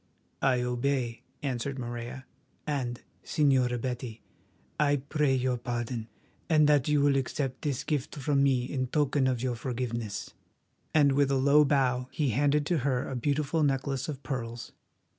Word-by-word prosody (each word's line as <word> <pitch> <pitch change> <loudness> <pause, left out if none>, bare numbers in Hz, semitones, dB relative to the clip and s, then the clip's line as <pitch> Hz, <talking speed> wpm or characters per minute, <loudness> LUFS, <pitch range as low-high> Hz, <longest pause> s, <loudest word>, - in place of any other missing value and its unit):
"I 130 -2 +3
obey," 125 -1 -1 0.2
answered 135 0 -2
Morella; 120 +1 -6 0.4
"and, 130 -5 -2 0.2
Señora 130 -5 +2
Betty, 125 -2 -5 0.6
I 145 -1 +4
pray 145 0 +1
your 130 -1 0
pardon, 120 -1 -3 0.4
and 155 -2 +5
that 145 -3 +4
you 150 -1 +3
will 140 -1 +4
accept 135 0 -2
this 140 -4 -2
gift 145 -4 -2
from 140 0 +1
me 135 -3 +3
in 130 -1 -2
token 140 -1 +1
of 125 -2 0
your 130 -1 0
forgiveness." 120 -4 -4 0.6
And 145 -3 +5
with 140 0 +3
a 140 - +2
low 140 +3 +5
bow 130 -3 +1
he 145 -1 0
handed 145 +4 +2
to 170 0 +1
her 130 -1 0
a 135 - -4
beautiful 145 +5 0
necklace 135 -1 0
of 140 -2 -6
pearls. 120 -3 -5
135 Hz, 155 wpm, -29 LUFS, 125-145 Hz, 0.6 s, and